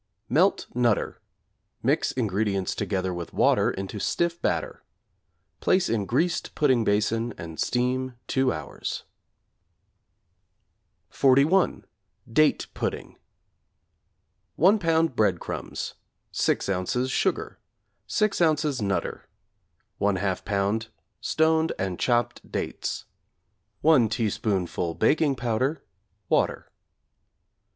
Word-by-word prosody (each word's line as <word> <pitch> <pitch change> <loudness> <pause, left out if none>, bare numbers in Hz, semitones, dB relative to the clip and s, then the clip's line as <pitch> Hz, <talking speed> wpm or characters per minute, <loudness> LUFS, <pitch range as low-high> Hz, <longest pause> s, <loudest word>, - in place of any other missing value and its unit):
Melt - - +3
'Nutter,' 120 -3 +1 0.6
mix - - +2
ingredients 100 -4 -1
together 95 -2 -2
with 85 -1 -6
water - - +4
into 95 +2 -5
stiff 170 - -1
batter; - - -2 0.8
place 185 -1 +2
in 105 -4 0
greased 165 +7 0
pudding 130 -6 +3
basin 110 +3 0
and 80 -1 -8
steam 125 +1 0
2 130 -1 +1
hours. - - -5 2.1
=31. 140 +8 +3 0.4
Date 155 +6 +3
Pudding= - - -4 1.4
1 195 +8 +5
lb. 165 -5 +2
breadcrumbs, 100 -6 -1 0.4
6 - - +1
ozs. 100 +7 -1
sugar, - - -1 0.5
6 215 -1 +1
ozs. 155 -6 +2
'Nutter,' 100 -1 -2 0.7
1/2 95 -2 0
lb. 100 +3 0 0.3
stoned 160 0 +2
and 95 -2 -3
chopped 120 -2 0
dates, - - -3 0.8
1 140 -8 +5
teaspoonful 100 -7 -1
baking 150 -2 +2
powder, 130 +5 -1 0.4
water. - - 0
120 Hz, 90 wpm, -26 LUFS, 100-150 Hz, 2.1 s, 1